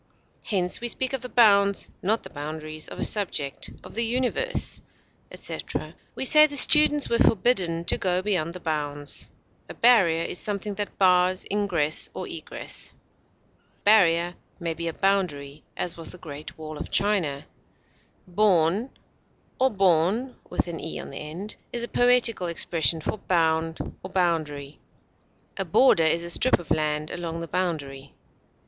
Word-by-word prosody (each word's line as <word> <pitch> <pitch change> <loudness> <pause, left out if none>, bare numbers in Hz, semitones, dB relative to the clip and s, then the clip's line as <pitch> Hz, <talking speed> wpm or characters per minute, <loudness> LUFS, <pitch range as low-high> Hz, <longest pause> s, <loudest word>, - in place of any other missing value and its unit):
Hence 180 -2 0
we 240 - -2
speak 260 +2 -1
of 265 - -2
the 250 - -7
bounds, 200 -4 +3
not 215 +4 0
the - - -11
boundaries, 155 +1 -6
of - - -10
a - - -2
subject, 160 -10 0
of - - -12
the 230 - 0
universe, 255 - -1 0.5
etc.; - - -6 0.2
we - - -3
say 305 +3 +8
the 290 -1 -4
students 295 -1 +7
were 235 - 0
forbidden 180 -7 +2
to - - +1
go 185 -1 0
beyond 175 -5 -1
the - - -7
bounds. 145 -3 -3 0.4
A - - -9
barrier 190 -9 +4
is 175 - -1
something 205 0 -2
that 205 +1 -5
bars 185 -1 +3
ingress 175 -7 +1
or - - -5
egress. - - -5 0.8
A - - -37
barrier 175 -5 +4 0.3
may 170 -2 -3
be 170 +1 -5
a 165 - -3
boundary, 155 -8 -1
as 175 - -2
was 165 - -5
the - - -8
Great 150 -3 -10
Wall 155 -1 -8
of - - -6
China. 185 -9 0 0.8
Bourn, 190 +3 +2 0.7
or 260 +1 +3
bourne, 195 +5 +1 0.2
is 170 +7 -5
a - - -2
poetical 245 -7 +3
expression 165 -1 +1
for 215 - -4
bound 165 -2 0 0.2
or 185 - -8
boundary. 155 -6 -2 0.8
A - - -1
border 175 -11 +4
is 165 +2 +1
a 170 - -3
strip 255 +8 +4
of 175 - -12
land 155 0 -1
along 170 -1 -5
the 165 - -6
boundary. 155 -7 -4
180 Hz, 145 wpm, -25 LUFS, 160-210 Hz, 0.8 s, say